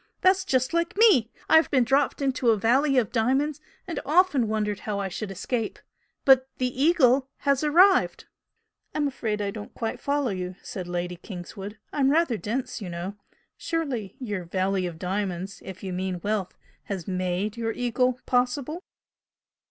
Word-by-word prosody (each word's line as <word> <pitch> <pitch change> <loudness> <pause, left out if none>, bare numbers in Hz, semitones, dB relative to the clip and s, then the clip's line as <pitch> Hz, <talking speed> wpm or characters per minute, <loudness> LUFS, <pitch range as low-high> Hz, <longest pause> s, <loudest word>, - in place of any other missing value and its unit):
That's 375 0 +4
just 260 -3 +1
like 340 +2 0
me! 390 - +5 0.2
I've 320 0 +5
been 260 -3 +4
dropped 275 +3 +1
into 260 -3 +1
a 225 - +4
Valley 265 +6 +3
of 230 -5 +2
Diamonds 270 +6 +1 0.2
and 345 -3 -4
often 300 -5 +3
wondered 210 -1 -1
how 210 -2 -3
I 195 -1 -2
should 210 +3 -5
escape 215 +4 -3 0.5
but 265 -1 +6
the 250 -1 0
Eagle 275 -5 +4
has 280 0 +2
arrived!" 360 +6 +4 0.7
"I'm 300 -1 +1
afraid 220 -6 -2
I 200 - -2
don't 205 0 -9
quite 225 -2 -3
follow 280 -4 0
you" 185 -1 -4
said 190 -7 -6
Lady 175 0 -3
Kingswood 195 +3 -8 0.2
"I'm 275 -2 +3
rather 310 -4 +3
dense, 230 +6 -3
you 190 - -5
know! 175 +3 -5 0.4
Surely 260 - -3
your 205 -8 -4
Valley 185 +1 0
of 170 -2 -7
Diamonds 190 +1 -3
if 190 0 -9
you 190 -2 -4
mean 185 0 -2
wealth 205 -3 -1 0.3
has 190 -5 -5
made 185 +2 -1
your 230 -1 -2
'Eagle' 250 +1 0
possible?" 255 +6 0
230 Hz, 160 wpm, -26 LUFS, 195-275 Hz, 0.7 s, but